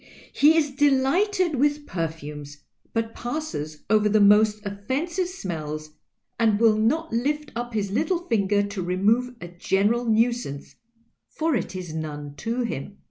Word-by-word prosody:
He 310 +3 +5
is 295 -3 +2
deliglited 290 +7 +2
with 290 +2 +1
perfumes, 150 - -5 0.3
but 225 0 -2
passes 240 - -5
over 215 0 +3
the 215 +1 +4
most 210 +1 +5
offensive 275 - -2
smells 155 - -5 0.5
and 220 -3 +3
will 225 -2 +5
not 245 +8 0
lift 295 +6 -1
up 240 0 -4
his 200 -2 -1
little 340 - 0
finger 205 - +2
to 200 -1 -4
remove 210 +8 +1
a 175 - -7
general 200 +7 0
nuisance, 225 - 0 0.6
for 320 -2 0
it 190 -3 -3
is 180 -4 -6
none 150 -2 -5
to 235 +3 -2
him."' 205 - -4
220 Hz, 140 wpm, -25 LUFS, 185-275 Hz, 0.6 s, He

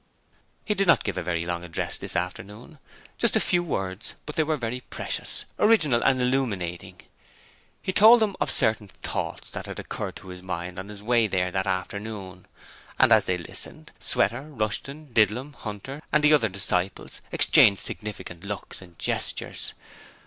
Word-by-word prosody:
He 210 - +1
did 195 -1 0
not 170 - +5
give 100 - -2
a - - -2
very 85 -1 -1
long 85 0 -3
address 85 -1 -1
this - - -3
afternoon 100 +5 -3
only 160 - -16 0.4
just - - +2
a - - +5
Few 175 - +2
Words; 95 - -4
but 150 - -6
they - - +3
were 155 0 0
very 125 0 -3
precious, - - -3
original 155 - +4
and 130 -1 +4
illuminating. 115 -10 -1 0.8
He 185 - -1
told 225 +5 +8
them 210 -3 +1
of - - +1
certain 110 -2 +2
Thoughts - - -5
that - - -6
had - - -6
occurred - - -5
to 95 - -11
his 90 0 -8
mind 90 0 -5
on 95 +2 -7
his 105 -1 -9
way 115 0 +3
there 90 -2 0
that 95 +1 -1
afternoon; 95 0 -4 0.5
and - - +5
as 110 -2 +6
they 90 - +1
listened, 85 - -7
Sweater, 120 +3 +2
Rushton, 140 +3 -3
Didlum, 115 +6 +2
Hunter, 120 +6 -7
and 150 - +3
the 150 +1 +6
other 115 -8 +4
disciples 95 -1 -2
exchanged 100 -2 +5
significant 90 -2 -6
looks 100 -1 -5
and 90 -3 -15
gestures. - - -2
105 Hz, 170 wpm, -26 LUFS, 95-135 Hz, 0.8 s, told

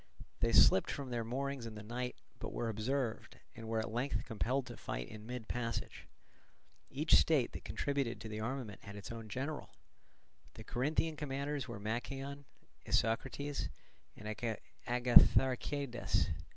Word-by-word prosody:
They - - +2
slipped 95 - +7
from 135 -3 -4
their 120 -1 0
moorings 130 +1 -2
in 110 - -7
the 105 - -7
night, 125 +3 -3 0.2
but - - -4
were 115 - -1
observed, 115 +2 -1 0.2
and 115 -1 -8
were 115 0 0
at 110 0 -1
length 125 +4 0
compelled 125 +3 0
to - - -8
fight - - -4
in 110 0 -9
mid 125 -2 -5
passage. 115 -1 -3 0.8
Each 150 +4 +1
state 145 -7 +6
that - - -8
contributed 140 -4 -1
to - - -6
the 110 0 -4
armament 115 -2 -3
had 100 0 -9
its 100 +2 -7
own 115 -2 -7
general; 140 +7 -4 0.8
the - - -8
Corinthian 155 +5 0
commanders 140 -1 -2
were 115 -4 -6
Machaon, 135 +6 -3 0.4
Isocrates, 140 +5 0 0.5
and 105 - -8 0.6
Agatharchidas. 125 +1 +4
125 Hz, 145 wpm, -36 LUFS, 115-140 Hz, 0.8 s, slipped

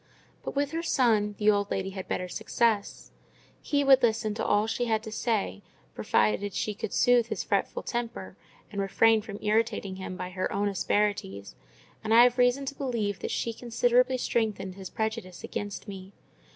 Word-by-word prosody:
But - - -6
with 285 0 0
her 330 +1 -2
son, 220 -9 +2
the 215 0 +4
old 205 -1 0
lady 190 0 -2
had 190 -1 -7
better 180 - -2
success: 220 +1 -1 0.5
he 285 -2 +1
would 270 -1 +6
listen 220 -2 +1
to 215 - -3
all 205 +1 +2
she 225 +2 -1
had 220 -2 0
to 220 - -7
say, 215 - -1 0.3
provided 180 - +1
she 215 - -1
could 200 - -5
soothe 245 -2 +4
his 215 -5 -3
fretful 200 - -1
temper, 235 0 -4 0.4
and 200 -1 -2
refrain 220 +3 +3
from 205 -1 -8
irritating 210 -3 0
him 190 -1 -6
by 180 0 -5
her 185 0 -2
own 205 +1 0
asperities; 195 - -1 0.5
and 220 +1 +2
I 235 - +9
have 245 0 +3
reason 250 +3 +3
to 275 - -4
believe 230 -8 -2
that - - -4
she 230 - -2
considerably 245 +2 +2
strengthened 215 -6 -1
his 190 0 -9
prejudice 220 -5 -4
against 205 +1 -5
me. 195 -1 -9
215 Hz, 180 wpm, -28 LUFS, 200-235 Hz, 0.5 s, I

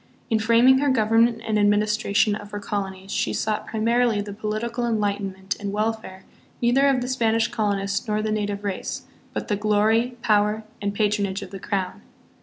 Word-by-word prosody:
In 220 - +3
framing 235 +4 +5
her 285 0 +2
government 225 -1 +3
and 215 -1 +1
administration 210 0 +2
of 205 0 -6
her 205 - -5
colo 200 -1 -2
nies, 190 +1 -11
she - - 0
sought 215 -1 -2
primarily 230 0 +1
the 205 0 -5
political 215 +3 -3
enlightenment 200 -4 -1
and 200 -1 -4
welfare 215 -2 -3 0.4
neither 255 +4 +3
of 265 -2 +2
the 245 - -3
Spanish 230 -3 +1
colonist 200 -3 -1
nor 215 0 0
the 215 - -1
native 205 -1 -2
race, 200 -2 -4 0.3
but - - -4
the 210 - +1
glory, 215 +4 +2
power, 210 0 +2 0.2
and 200 0 -2
patronage 205 -2 0
of - - -10
the 195 - -7
crown. 190 -2 -3
215 Hz, 175 wpm, -24 LUFS, 205-230 Hz, 0.4 s, framing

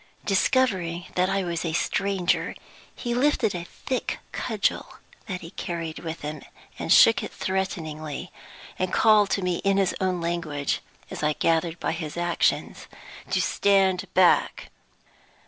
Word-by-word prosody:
Discovering 190 -5 +1
that 180 +1 +2
I 195 0 0
was 170 -2 -2
a 165 -2 -2
stranger, 190 +1 0 0.4
he 240 -1 -3
lifted 255 -4 +2
a 175 -1 -5
thick 255 +7 -4
cudgel - - -1 0.3
that 185 -4 -4
he 165 0 -9
carried 165 -2 -5
with 165 -1 -6
him, 150 0 -5 0.5
shook - - +7
it - - -6
threateningly, 160 -6 -3 0.5
and 185 0 0
called 215 -2 +5
to 195 - 0
me 180 -1 0
in 195 0 +1
his 195 -2 +2
own 185 -1 0
language 165 -4 -2 0.3
(as - - -5
I 150 0 +2
gathered 165 +1 0
by - - -1
his 160 -1 -5
actions) 175 0 0 0.4
to - - +1
stand 195 -2 +2
back. 185 -2 +3
180 Hz, 140 wpm, -25 LUFS, 165-195 Hz, 0.5 s, shook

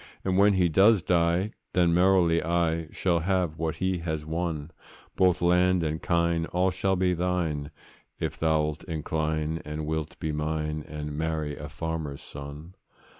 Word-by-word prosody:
And 95 -1 +1
when 100 +2 +5
he 90 -2 +3
does 95 +3 +5
die, 85 +3 +2 0.2
then 85 -2 +3
merrily 90 -2 +4
I 85 -1 0
Shall 85 -1 0
have 90 -2 0
what 80 -1 -1
he 95 -1 -1
has 80 -2 -3
won; 80 -1 -3 0.4
Both 90 -1 +3
land 90 0 +3
and 80 0 -2
kine, 85 -1 +1
all 90 +1 +1
shall 95 +1 0
be 90 0 +2
thine, 85 -5 -1 0.5
If 80 -1 -2
thou'lt 80 -1 0
incline, 80 -1 -2
and 75 +1 -5
wilt 80 -1 -3
be 80 - -2
mine, 75 0 -2
And 75 -1 -5
marry 80 -1 -2
a 75 - -8
farmer's 80 -2 -4
son. 70 +5 -9
80 Hz, 155 wpm, -27 LUFS, 75-90 Hz, 0.5 s, when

